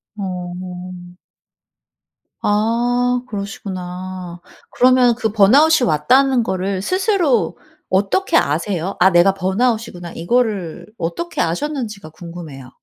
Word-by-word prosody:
어. 180 -1 -7 1.2
아. 245 +4 +1
그러시구나. 185 -3 -6 0.3
그러면 250 -1 +4
그 220 -2 -2
번아웃이 255 +7 +5
왔다는 250 - +3
거를 190 -1 -2
스스로 370 - +1 0.3
어떻게 205 - +2
아세요? 170 - -1
'아 185 - +6
내가 180 +1 +4
번아웃이구나.' 195 -2 -1
이거를 200 -2 -1
어떻게 255 - -3
아셨는지가 215 - -3
궁금해요. 160 -5 -10
195 Hz, 250 characters per minute, -19 LUFS, 180-245 Hz, 1.2 s, 아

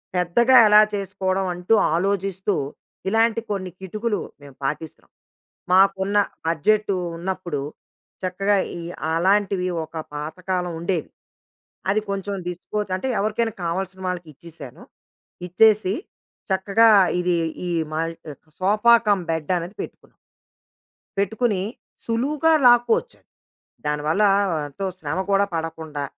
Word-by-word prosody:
పెద్దగా 235 +9 +4
ఎలా 210 0 +8
చేసుకోవడం 190 -1 -2
అంటూ 180 +5 0 0.2
ఆలోజిస్తూ, 195 +2 0 0.5
ఇలాంటి 225 +2 +2
కొన్ని 185 -3 -3
కిటుకులు 210 +3 -2 0.2
మేం 140 -1 -13
పాటిస్తున్నాం. 155 +3 -5 0.6
మాకున్న 195 +1 +4 0.3
బడ్జెటు 200 +5 +1 0.2
ఉన్నప్పుడు, 175 -5 -3 0.6
చక్కగా 195 +3 +1 0.2
ఈ - - -7 0.3
అలాంటివి 190 +1 +2 0.2
ఒక 160 - -17 0.2
పాతకాలం 180 +4 -3
ఉండేవి. 170 -1 -2 0.8
అది 210 +2 +2
కొంచెం 200 0 -3
డిస్‌పోజ్ 195 +3 -4
అంటే 225 +8 -3
ఎవరికైనా 220 +2 -1
కావాల్సిన 190 +2 -3
వాళ్ళకిచ్చేశాను. 165 -5 -8 0.6
ఇచ్చేసి, 205 +1 +4 0.6
చక్కగా 200 +4 +4 0.3
ఇది 180 -1 +1 0.3
ఈ - - -2 0.2
మల్ 165 +1 -2 0.3
ట్ - - -34
సోఫా 215 +5 +5
కమ్ 200 -2 +3
బెడ్డనేది 170 +4 -2
పెట్టుకున్నాం. - - -12 1.0
పెట్టుకుని, 205 0 0 0.4
సులువుగా 285 +8 +1
లాక్కోవచ్చది. 240 - +3 0.6
దానివల్ల 150 +6 +1 0.5
ఎంతో 145 +8 -5
శ్రమ 150 +2 -3
కూడా 200 0 +4
పడకుండా 160 -2 -4
190 Hz, 100 wpm, -23 LUFS, 170-210 Hz, 1.0 s, ఎలా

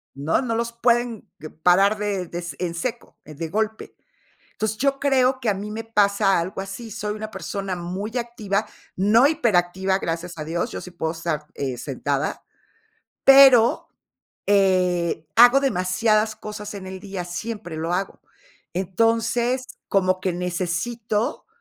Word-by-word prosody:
¿No? 145 - 0
No 230 -3 -2
los 235 +1 -1
pueden 235 -1 0
que 155 +1 -8
parar 190 +6 +3
de 200 -3 -2
de 175 +1 -6 0.2
en 175 -2 -2
seco, 235 +7 -5
de 155 +2 -6
golpe. 220 +3 -3 0.6
Entonces, 220 0 -3
yo 275 +2 +1
creo 260 -2 +2
que 235 -4 +1
a - - +1
mí 205 +2 -6
me 220 +1 -5
pasa 200 -3 +2
algo 185 +3 -4
así. 220 +4 -8
Soy 210 0 -4
una 215 0 -6
persona 195 -3 -4
muy 190 +6 -5
activa, 220 -4 -2 0.3
no 215 +7 +5
hiperactiva, 190 - +1
gracias 170 0 -4
a 155 - -4
Dios. 170 +8 -2
Yo - - -5
sí 180 - -10
puedo 160 -2 -3
estar, 160 -2 -3
eh, 135 -3 -3
sentada, 140 +3 -3 0.8
pero 270 -4 +7 0.6
eh, 180 -5 +2
hago 245 +3 +8
demasiadas 215 -1 +1
cosas 210 -1 -7
en 190 -2 -7
el 190 0 -7
día, 195 -3 -5
siempre 180 -1 -6
lo 165 +2 -2
hago. 190 +2 -3 0.5
Entonces, 230 +6 +1 0.2
como 185 -1 +2
que 185 -1 -1
necesito 185 - -2
200 Hz, 145 wpm, -23 LUFS, 175-230 Hz, 0.8 s, hago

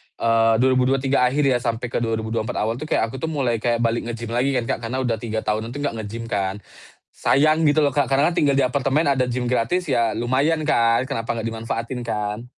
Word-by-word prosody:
eee, 115 0 +3
2023 130 0 +2
akhir 140 +4 0
ya 130 -3 +3
sampe 120 0 -3
ke - - 0
2024 110 -1 -2
awal 115 +3 -1
tuh 155 - -6
kayak 115 - 0
aku 135 - -7
tuh 160 - -3
mulai 130 -7 -1
kayak 120 +1 0
balik 115 0 0
nge-gym 115 -1 -5
lagi 130 +3 +1
kan, 120 - +1
Kak, - - -1
karena 130 +3 -2
udah 115 -3 -1
3 110 -1 -3
tahunan 110 +3 -2
itu - - -4
gak 140 -5 -2
nge-gym 110 +2 -6
kan, 95 -1 -1 0.6
sayang 155 +4 +3
gitu 150 0 +4
loh, 145 -2 +2
Kak, 145 - +2
karena 140 +3 +4
kan 175 - -3
tinggal 145 -4 +3
di 140 - +3
apartemen 135 +4 +1
ada 135 -2 +2
gym 125 0 -2
gratis 125 +9 0
ya 115 -4 +2
lumayan 135 +7 +1
kan, 115 -2 +3
kenapa 115 0 -2
gak - - -6
dimanfaatin 115 +2 -4
kan. 105 0 -3
120 Hz, 220 wpm, -22 LUFS, 115-135 Hz, 0.6 s, gitu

